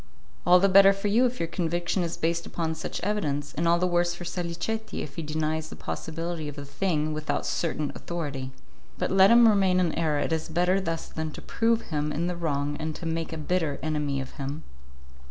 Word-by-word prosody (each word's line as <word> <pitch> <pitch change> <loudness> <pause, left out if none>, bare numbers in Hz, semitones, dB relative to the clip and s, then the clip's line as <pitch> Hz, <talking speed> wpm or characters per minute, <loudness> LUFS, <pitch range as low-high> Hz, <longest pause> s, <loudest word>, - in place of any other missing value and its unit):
"All 180 +1 +8
the 195 - +4
better 195 +1 +7
for 195 +1 -2
you 240 +5 +4
if 250 +1 -5
your 165 - +1
conviction 175 +2 -1
is 170 -1 -2
based 170 +1 -1
upon 165 -2 -2
such 160 - -5
evidence, 170 -8 -1
and 165 +3 0
all 170 +1 +5
the 180 - +1
worse 175 -1 +1
for 175 - -8
Salicetti 175 +6 -3
if 140 - -9
he - - -3
denies 155 0 -2
the - - -8
possibility 165 0 -4
of 145 - -6
the 145 -1 -7
thing 155 0 -1
without 155 0 -2
certain 155 -3 -1
authority. 145 -6 -4 0.5
But - - -1
let 190 +1 +7
him 235 0 +8
remain 195 -4 +4
in 175 -3 +1
error; 155 -3 +1
it 160 - 0
is 160 0 -2
better 180 +4 +2
thus 165 -3 -3
than 160 0 -4
to - - -9
prove 230 0 +1
him 150 0 0
in 165 +3 -1
the 180 0 -1
wrong 145 -3 -1
and 155 -1 -3
to 175 - -8
make 165 0 -2
a 160 - -4
bitter 155 -2 -1
enemy 150 -3 -1
of 135 - -6
him." 140 +3 -4
165 Hz, 215 wpm, -27 LUFS, 155-180 Hz, 0.5 s, All